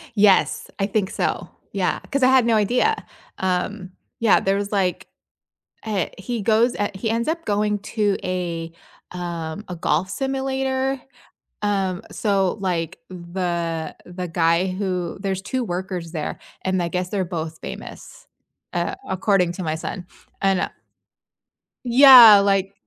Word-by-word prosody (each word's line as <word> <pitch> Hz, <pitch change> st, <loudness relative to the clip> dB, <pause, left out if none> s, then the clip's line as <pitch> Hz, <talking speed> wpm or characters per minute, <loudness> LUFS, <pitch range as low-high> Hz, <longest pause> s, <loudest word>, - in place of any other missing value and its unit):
Yes, 200 Hz, -2 st, +3 dB
I 195 Hz, -, +1 dB
think 205 Hz, -2 st, 0 dB
so, -, -, -2 dB, 0.2 s
yeah, -, -, 0 dB
'cause 275 Hz, -1 st, +1 dB
I -, -, +7 dB
had 260 Hz, -2 st, +5 dB
no 230 Hz, -1 st, +3 dB
idea. 245 Hz, -, +2 dB, 0.4 s
Um, 185 Hz, +1 st, -2 dB, 0.3 s
yeah, 230 Hz, -3 st, +5 dB
there 195 Hz, 0 st, +1 dB
was 200 Hz, 0 st, -3 dB
like, 190 Hz, -4 st, 0 dB, 0.8 s
uh 210 Hz, -5 st, -1 dB
he 230 Hz, +3 st, -4 dB
goes 230 Hz, +3 st, +3 dB, 0.2 s
he 205 Hz, +4 st, -3 dB
ends 230 Hz, +3 st, -1 dB
up 330 Hz, +1 st, -2 dB
going 210 Hz, 0 st, 0 dB
to 205 Hz, 0 st, 0 dB
a, 170 Hz, -2 st, -3 dB, 0.4 s
um, 170 Hz, +1 st, -5 dB
a 180 Hz, -, -5 dB
golf 175 Hz, +2 st, 0 dB
simulator, 265 Hz, +1 st, -1 dB, 0.6 s
um, 195 Hz, -3 st, 0 dB
so 195 Hz, -3 st, 0 dB
like, 175 Hz, -2 st, -2 dB
the 170 Hz, -3 st, -3 dB
the 180 Hz, 0 st, -6 dB
guy 170 Hz, +2 st, +2 dB
who 185 Hz, -2 st, -3 dB
There's 190 Hz, -2 st, -2 dB
2 255 Hz, +5 st, -2 dB
workers 180 Hz, -3 st, -4 dB
there, 155 Hz, -3 st, -4 dB, 0.2 s
and 185 Hz, -1 st, 0 dB
I 170 Hz, -, 0 dB
guess 180 Hz, +1 st, -2 dB
they're 195 Hz, -2 st, -1 dB
both 165 Hz, -2 st, -5 dB
famous, -, -, -9 dB, 0.5 s
uh- 175 Hz, 0 st, -1 dB
according 190 Hz, -1 st, +2 dB
to 185 Hz, -, -5 dB
my 155 Hz, -1 st, -1 dB
son- 175 Hz, +3 st, -6 dB, 0.4 s
and 195 Hz, -1 st, +2 dB
I -, -, -1 dB, 1.2 s
Yeah, 240 Hz, -4 st, +10 dB
like, 195 Hz, -1 st, +1 dB
190 Hz, 140 wpm, -22 LUFS, 180-215 Hz, 1.2 s, Yeah